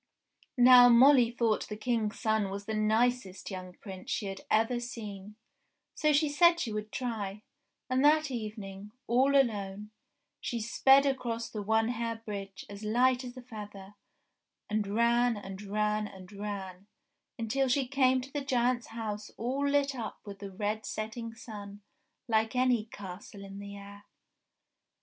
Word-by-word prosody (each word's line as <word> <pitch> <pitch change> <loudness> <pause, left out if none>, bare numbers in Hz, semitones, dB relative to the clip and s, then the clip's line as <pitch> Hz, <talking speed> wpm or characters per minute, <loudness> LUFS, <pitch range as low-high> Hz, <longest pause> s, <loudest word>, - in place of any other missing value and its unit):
Now 245 0 +9
Molly 250 0 +7
thought 235 -2 0
the 210 - -5
King's 220 -1 -1
son 220 -3 +1
was 200 +1 -6
the 220 - -3
nicest 215 -2 0
young 185 -1 -7
prince 190 -1 -10
she 210 - -1
had 195 -1 -5
ever 225 +3 +2
seen, 210 -4 -7 0.6
so 305 - +2
she 300 +1 +3
said 340 +4 +5
she 225 -8 -2
would 215 0 -4
try, 215 -5 -4 0.4
and 255 +1 +1
that 305 0 +4
evening, 210 -3 -6
all 260 +4 +3
alone, 210 -4 -1 0.5
she 235 - -3
sped 270 +5 +5
across 240 -4 -2
the 215 - -4
One 220 +2 +2
Hair 230 -1 -3
Bridge 195 -2 -6
as 200 +1 -9
light 250 +4 +2
as 250 0 -8
a 255 - -9
feather, 205 -4 -9 0.7
and 210 -1 -1
ran, 235 +2 +2
and 195 -1 -8
ran, 210 +1 0
and 190 -1 -12
ran, 200 -2 -6 0.5
until 250 +4 0
she 260 +1 +1
came 260 -1 +3
to 265 +2 -11
the 290 - -1
giant's 250 -2 +1
house 215 -2 -5
all 270 +5 -1
lit 280 -1 +2
up 235 -4 -6
with 200 -1 -9
the 200 - -7
red 210 +3 -3
setting 225 +1 -5
sun 205 -3 -9 0.4
like 220 +1 +1
any 250 -3 +2
castle 200 -1 -9
in 195 0 -9
the 200 0 -8
air. 200 +1 -12
220 Hz, 155 wpm, -30 LUFS, 205-245 Hz, 0.7 s, Now